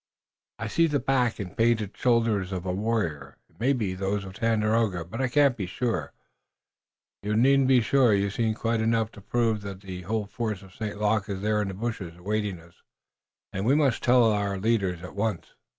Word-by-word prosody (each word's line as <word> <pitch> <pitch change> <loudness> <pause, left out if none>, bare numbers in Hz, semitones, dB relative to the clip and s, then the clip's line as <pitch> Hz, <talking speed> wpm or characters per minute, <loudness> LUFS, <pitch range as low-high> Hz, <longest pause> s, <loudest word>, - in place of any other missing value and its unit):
"I 115 - -5
see 165 +9 +2
the 145 -2 0
back 125 -4 +1
and 95 -4 -6
painted 115 -3 +1
shoulder 115 -4 +2
of 95 -1 -5
a 90 - -1
warrior. 90 -10 -2
It - - -30
may 125 +5 +2
be 110 -9 -1
those 95 +1 -2
of 95 - -9
Tandakora, 110 -3 +1
but 115 +9 -5
I 135 - +2
cannot 140 0 +3
be 95 -4 -3
sure." 115 +5 -2 1.1
"You 105 +1 -1
needn't 135 +3 +4
be. 130 -3 +5
You've 105 -7 +4
seen 110 -1 0
quite 115 0 0
enough 115 0 +1
to 100 - -13
prove 110 +1 0
that 100 -1 -7
the 95 -2 -7
whole 105 +3 -2
force 105 -2 -4
of 95 -1 -15
St. 105 -1 -5
Luc 105 -1 +1
is 95 -1 -3
there 105 0 +1
in 105 - -2
the 95 - -5
bushes, 100 -6 -4
awaiting 100 0 -2
us, 85 +1 -20 0.7
and 95 0 -2
we 130 +6 +3
must 140 -6 +2
tell 125 0 +5
our 100 -3 +1
leaders 95 -4 0
at 90 - -8
once." 100 -3 -2
105 Hz, 200 wpm, -26 LUFS, 95-115 Hz, 1.1 s, be